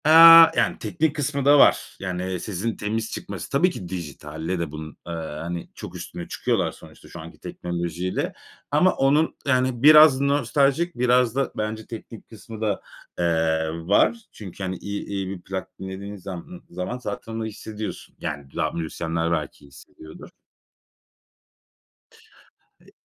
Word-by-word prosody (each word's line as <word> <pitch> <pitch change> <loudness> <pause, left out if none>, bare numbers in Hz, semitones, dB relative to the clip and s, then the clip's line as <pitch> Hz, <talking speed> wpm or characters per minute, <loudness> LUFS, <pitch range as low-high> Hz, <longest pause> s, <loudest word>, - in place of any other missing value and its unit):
Eee, 155 - +5 0.4
yani, - - +1
teknik 160 -3 -1
kısmı 140 -1 -2
da 145 0 +7
var. - - +4
Yani, 90 0 -3
sesin 105 +4 -3
temiz 110 +1 -3
çıkması. 100 -4 -6
Tabii 160 +7 +3
ki, 95 - -8
dijitalle 80 0 -5
de 85 -3 -3
bunun, 80 0 -8
eee, 85 - -4
hani, 80 +1 -5
çok - - -9
üstüne 85 - -7
çıkıyorlar - - 0
sonuçta, - - -16
şu - - -10
anki - - -11
teknolojiyle. 85 +1 -3 0.4
Ama 155 +6 +4
onun, 145 +4 +2
yani 130 -2 +1
biraz 150 -2 +8
nostaljik, 140 +4 +1
biraz 125 -1 +3
da 135 -1 0
bence 110 0 -3
teknik 115 -1 -10
kısmı 110 0 -11
da, 105 -3 -1 0.4
eee, 80 -2 +1 0.2
var. 105 - +4
Çünkü 95 -2 -9
hani, 95 0 -2
i 100 +2 -5
iyi 100 -2 -3
bir 95 -2 -6
plak 95 0 -7
dinlediğin 95 +2 -7
zam 95 -2 -7
ımm, 180 +1 -11
zaman, 90 +7 -4
zaten 125 -2 -6
onu 115 0 -3
hissediyorsun. 110 0 -7
Yani, 70 -3 -6
da - - 0
müzisyenler 80 0 -2
belki 80 -3 -3
hissediyordur. 80 +2 -14 2.5
E, - - -26
ç - - -19
100 Hz, 150 wpm, -24 LUFS, 85-125 Hz, 2.5 s, biraz